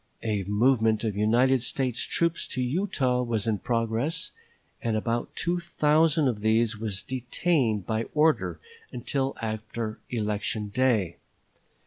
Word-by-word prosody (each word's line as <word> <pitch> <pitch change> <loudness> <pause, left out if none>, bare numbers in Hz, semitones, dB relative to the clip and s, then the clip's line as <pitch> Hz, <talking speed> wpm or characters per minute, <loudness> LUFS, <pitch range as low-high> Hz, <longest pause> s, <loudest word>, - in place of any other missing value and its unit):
A 105 -3 0
movement 110 +1 +2
of 110 -3 -1
United 120 +5 +3
States 125 0 -1
troops 170 0 0
to 130 - -3
Utah 130 -4 0
was 115 -4 -1
in 110 -3 0
progress, 115 - -1 0.5
and 115 -2 0
about 115 +2 -2
two 175 +1 0
thousand 155 -3 +2
of 110 -5 -1
these 110 0 +2
were 110 0 -2 0.2
detained 125 - 0
by 110 0 -1
order 155 +1 +2 0.3
until 135 +2 -2
after 110 0 -4
election 105 -2 -2
day. 110 -7 +1
120 Hz, 125 wpm, -27 LUFS, 110-135 Hz, 0.5 s, United